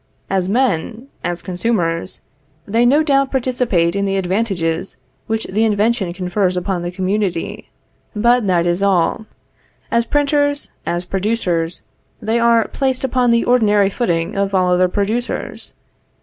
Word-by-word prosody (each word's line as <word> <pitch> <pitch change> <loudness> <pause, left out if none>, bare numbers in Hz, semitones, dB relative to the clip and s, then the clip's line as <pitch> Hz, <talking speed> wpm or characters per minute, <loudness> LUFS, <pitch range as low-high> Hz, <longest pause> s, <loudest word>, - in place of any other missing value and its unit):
As 190 -1 0
men, 235 +1 0
as 175 0 -3
consumers, 180 -3 -2 0.4
they 230 +4 +2
no 290 +5 +4
doubt 275 -3 +2
participate 240 -10 0
in 200 0 0
the 195 0 0
advantages 185 -3 -1 0.3
which 220 0 -1
the 215 +4 0
invention 215 -2 +1
confers 180 +1 -1
upon 180 0 -2
the 175 - -3
community; 185 -1 -2 0.5
but 235 +1 +3
that 175 -2 +2
is 175 +2 0
all. 200 +2 +1 0.6
As 235 0 +1
printers, 285 0 +1 0.2
as 175 +1 -1
producers, 180 -4 -1 0.4
they 225 +2 0
are 235 -1 +3
placed 265 -1 -1
upon 255 -1 +1
the 235 0 +3
ordinary 210 -5 +3
footing 170 -8 -1
of 200 0 0
all 180 -1 +3
other 180 +1 +3
producers. 215 +6 -2
200 Hz, 135 wpm, -18 LUFS, 180-235 Hz, 0.6 s, no